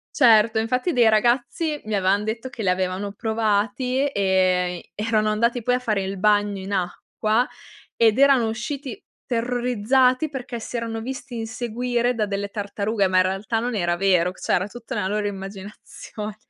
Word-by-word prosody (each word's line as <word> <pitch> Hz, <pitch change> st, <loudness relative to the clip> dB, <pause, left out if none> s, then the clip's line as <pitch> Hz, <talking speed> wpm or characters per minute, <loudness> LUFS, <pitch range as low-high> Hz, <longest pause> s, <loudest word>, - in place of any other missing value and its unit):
Certo, 220 Hz, -2 st, +5 dB
infatti 250 Hz, +9 st, 0 dB
dei 240 Hz, -5 st, +5 dB
ragazzi 245 Hz, +8 st, +1 dB
mi 215 Hz, -, -2 dB
avevan 195 Hz, +1 st, +2 dB
detto 225 Hz, +4 st, -4 dB
che 240 Hz, -, -10 dB
li 195 Hz, -, 0 dB
avevano 185 Hz, +2 st, -1 dB
provati, 220 Hz, +5 st, 0 dB
ehm, 185 Hz, -3 st, +1 dB, 0.2 s
erano 215 Hz, 0 st, +1 dB
andati 235 Hz, +3 st, +1 dB
poi 245 Hz, +2 st, +2 dB
a -, -, -1 dB
fare 215 Hz, -5 st, -1 dB
il 190 Hz, +1 st, -4 dB
bagno 205 Hz, 0 st, +2 dB
in 190 Hz, +2 st, -6 dB
acqua, 215 Hz, +6 st, -1 dB, 0.5 s
ed 225 Hz, 0 st, +4 dB
erano 275 Hz, -4 st, +5 dB
usciti 270 Hz, -, -5 dB, 0.2 s
terrorizzati 250 Hz, +3 st, +1 dB
perché 250 Hz, -4 st, -6 dB
si 240 Hz, -, -5 dB
erano 230 Hz, -1 st, -3 dB
visti 250 Hz, 0 st, -6 dB
inseguire 240 Hz, +2 st, -1 dB
da 215 Hz, -2 st, 0 dB
delle 200 Hz, 0 st, -3 dB
tartarughe, 205 Hz, 0 st, -1 dB
ma 185 Hz, -, 0 dB
in 185 Hz, -, +6 dB
realtà 195 Hz, +5 st, -1 dB
non 240 Hz, +2 st, -2 dB
era 175 Hz, -4 st, 0 dB
vero, 180 Hz, -2 st, +2 dB
c -, -, -18 dB
cioè -, -, -1 dB
era 185 Hz, -, +2 dB
tutta 230 Hz, +1 st, -10 dB
una 190 Hz, -2 st, -1 dB
loro 210 Hz, +1 st, -1 dB
immaginazione. 200 Hz, +2 st, -8 dB
220 Hz, 165 wpm, -23 LUFS, 200-245 Hz, 0.5 s, in